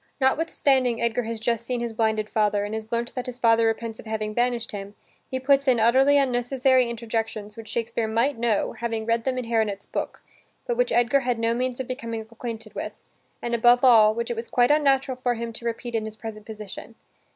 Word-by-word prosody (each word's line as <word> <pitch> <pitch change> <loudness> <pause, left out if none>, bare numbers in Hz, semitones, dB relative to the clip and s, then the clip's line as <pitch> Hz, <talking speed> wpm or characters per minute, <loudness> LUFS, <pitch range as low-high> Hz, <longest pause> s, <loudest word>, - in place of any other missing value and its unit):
Notwithstanding 265 -3 +2
Edgar 235 0 0
has 230 0 -4
just 230 0 -1
seen 245 +1 -2
his 235 -1 -3
blinded 220 -1 0
father, 210 -1 +1
and 205 - -5
has 220 0 -5
learnt 235 0 -2
that 255 0 -4
his 250 -1 -6
father 230 -2 +4
repents 225 0 -3
of - - -11
having 215 -1 -3
banished 240 0 0
him, 200 0 -7 0.3
he 260 - -2
puts 275 +1 +3
in 250 -3 +4
utterly 265 +5 +5
unnecessary 255 -1 +2
interjections 225 -2 -4
which 225 -1 -10
Shakespeare 230 0 -2
might 235 +6 +1
know, 230 -3 0
having 230 -2 -3
read 230 0 0
them 260 -1 0
in 250 - -3
Haronet's 220 -4 -1
book, - - -5 0.4
but 485 - -1
which - - +1
Edgar 240 +4 +3
had 250 -3 -1
no 230 0 +1
means 250 +1 -2
of 260 - -2
becoming 230 -3 -4
acquainted 225 -1 -8
with, - - -5 0.5
and 235 - -2
above 240 +2 +5
all, 220 -4 +7
which 235 0 -2
it - - -2
was 230 +1 -5
quite 245 +2 +3
unnatural 270 -3 +2
for 245 -1 +1
him 230 0 -5
to 235 - -9
repeat 235 +1 -4
in 220 -1 -1
his 220 0 -7
present 215 -1 -8
position. 215 +1 -9
235 Hz, 210 wpm, -25 LUFS, 220-250 Hz, 0.5 s, all